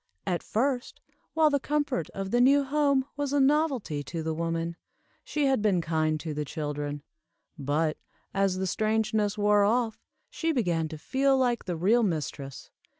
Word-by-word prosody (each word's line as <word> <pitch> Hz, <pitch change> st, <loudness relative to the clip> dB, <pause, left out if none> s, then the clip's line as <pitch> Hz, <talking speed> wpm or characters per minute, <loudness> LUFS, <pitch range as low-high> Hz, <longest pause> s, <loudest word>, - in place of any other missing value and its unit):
At 180 Hz, -3 st, -1 dB
first, 250 Hz, +2 st, -1 dB, 0.4 s
while 315 Hz, -1 st, +4 dB
the 285 Hz, -, +2 dB
comfort 285 Hz, -, -1 dB
of 195 Hz, 0 st, -5 dB
the 240 Hz, -, +3 dB
new 280 Hz, +3 st, +5 dB
home 280 Hz, -1 st, +2 dB
was 285 Hz, -1 st, -2 dB
a 285 Hz, -, +3 dB
novelty 270 Hz, -, +1 dB
to 165 Hz, -2 st, -4 dB
the 160 Hz, 0 st, -1 dB
woman, 165 Hz, +1 st, -2 dB, 0.5 s
she 295 Hz, -1 st, -1 dB
had 265 Hz, -5 st, +2 dB
been 200 Hz, -4 st, +2 dB
kind 155 Hz, -1 st, 0 dB
to 160 Hz, -2 st, -4 dB
the 150 Hz, 0 st, -2 dB
children; 145 Hz, -1 st, -4 dB, 0.5 s
but, 155 Hz, +1 st, -1 dB, 0.3 s
as 195 Hz, -1 st, +1 dB
the 190 Hz, -, -1 dB
strangeness 215 Hz, +1 st, 0 dB
wore 205 Hz, 0 st, +4 dB
off, 225 Hz, +1 st, +1 dB, 0.3 s
she 325 Hz, 0 st, -1 dB
began 175 Hz, -, 0 dB
to 155 Hz, -, -7 dB
feel 270 Hz, -, +2 dB
like 245 Hz, -3 st, +1 dB
the 175 Hz, -3 st, -3 dB
real 210 Hz, +8 st, +3 dB
mistress. 150 Hz, -, -3 dB
205 Hz, 165 wpm, -28 LUFS, 160-265 Hz, 0.5 s, new